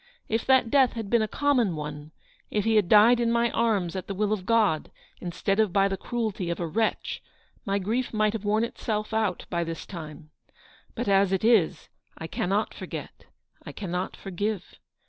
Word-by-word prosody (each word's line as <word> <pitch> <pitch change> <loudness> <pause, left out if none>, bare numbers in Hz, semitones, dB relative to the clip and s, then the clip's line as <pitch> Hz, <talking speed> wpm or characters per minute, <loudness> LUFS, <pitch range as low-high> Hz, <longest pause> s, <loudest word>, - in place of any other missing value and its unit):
If 225 +1 -1
that 260 -4 +4
death 265 -4 +4
had 225 -4 -5
been 235 -1 +4
a 215 - 0
common 245 - +1
one; 150 0 -6 0.4
if 210 -2 -1
he 225 0 +3
had 205 -5 +3
died 225 +3 +7
in 235 -1 +1
my 235 0 +2
arms 205 -7 0
at 185 - -5
the 195 - -4
will 210 +2 +1
of 190 -3 -4
God 215 -9 +2 0.3
instead 195 +3 -2
of 215 -4 +3
by 195 +1 +3
the 195 - -2
cruelty 215 -4 -3
of 170 - -2
a 175 - -1
wretch, 220 +8 -1 0.5
my 195 0 +1
grief 225 +6 -1
might 215 -1 +1
have 220 -3 -4
worn 215 +2 +2
itself 215 -2 -3
out 215 -5 0
by 170 -1 0
this 165 0 -6
time. 155 -3 -9 0.6
But 240 - -3
as 195 -1 +4
it 190 0 0
is, 220 -7 +3 0.3
I 160 - -6
cannot 195 +5 -1
forget; - - -8 0.4
I - - -9
cannot 180 -2 -4
forgive. 200 +1 -4
205 Hz, 190 wpm, -26 LUFS, 180-225 Hz, 0.6 s, died